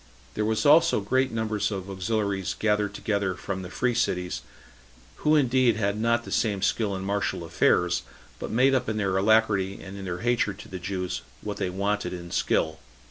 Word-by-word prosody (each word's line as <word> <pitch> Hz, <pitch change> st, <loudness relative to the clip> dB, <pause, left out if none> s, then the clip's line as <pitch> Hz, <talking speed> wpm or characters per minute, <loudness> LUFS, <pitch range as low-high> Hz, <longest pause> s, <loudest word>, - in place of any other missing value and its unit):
There 105 Hz, -, -1 dB
were 110 Hz, +1 st, +1 dB
also 165 Hz, +1 st, +6 dB
great 130 Hz, +6 st, +1 dB
numbers 110 Hz, -2 st, -1 dB
of 95 Hz, -3 st, -5 dB
auxiliaries 100 Hz, 0 st, -1 dB
gathered 105 Hz, -2 st, +1 dB
together 100 Hz, -3 st, -1 dB
from 95 Hz, 0 st, -4 dB
the 90 Hz, -, -7 dB
[free] 125 Hz, +5 st, 0 dB
cities, 90 Hz, -6 st, -1 dB, 0.8 s
who 155 Hz, 0 st, +3 dB
indeed 130 Hz, -4 st, +3 dB
had 100 Hz, -2 st, 0 dB
not 115 Hz, +2 st, +1 dB
the -, -, -8 dB
same 100 Hz, -4 st, 0 dB
skill 105 Hz, -4 st, +1 dB
in 95 Hz, -, -5 dB
martial 100 Hz, -3 st, -1 dB
affairs, 90 Hz, +1 st, +2 dB, 0.4 s
but -, -, -5 dB
made 130 Hz, +4 st, +3 dB
up 130 Hz, -3 st, +1 dB
in 110 Hz, -, -2 dB
their 100 Hz, -3 st, 0 dB
alacrity 100 Hz, -1 st, +2 dB
and 95 Hz, 0 st, -9 dB
in 100 Hz, -1 st, -7 dB
their 90 Hz, -1 st, -4 dB
hatred 115 Hz, -4 st, +1 dB
to -, -, -11 dB
the 95 Hz, -, -7 dB
Jews 90 Hz, 0 st, -3 dB, 0.2 s
what 105 Hz, -1 st, -5 dB
they 95 Hz, -2 st, -1 dB
wanted 100 Hz, 0 st, -1 dB
in 85 Hz, -1 st, -7 dB
skill. 80 Hz, 0 st, 0 dB
100 Hz, 190 wpm, -26 LUFS, 95-115 Hz, 0.8 s, also